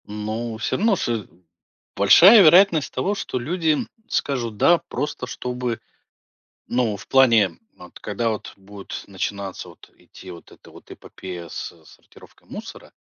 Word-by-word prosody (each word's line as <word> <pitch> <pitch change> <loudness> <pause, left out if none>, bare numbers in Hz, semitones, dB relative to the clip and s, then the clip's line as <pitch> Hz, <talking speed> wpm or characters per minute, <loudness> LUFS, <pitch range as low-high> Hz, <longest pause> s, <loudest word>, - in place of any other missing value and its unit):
Ну, 110 +2 -5
всё 105 -1 -2
равно, 215 +1 +2
с 115 - -3 0.7
большая 185 - +8
вероятность 170 -2 +5
того, 190 +11 -1
что 195 -9 -4
люди 160 +3 0 0.3
скажут 120 - -2
"да" 170 +9 +4
просто 135 -3 -4
чтобы 125 -1 -4 0.9
Ну, 120 -4 0
в - - -14
плане, 115 -9 +4 0.2
вот 90 -1 -14
когда 110 +3 -2
вот 110 -2 -5
будет 100 0 -9
начинаться 100 -1 -5
вот 85 - -17
идти 95 - -15
вот 85 - -13
эта - - -17
вот - - -16
эпопея 90 -2 -9
с - - -6
сортировкой - - -20
мусора. - - -10
115 Hz, 140 wpm, -22 LUFS, 100-150 Hz, 0.9 s, большая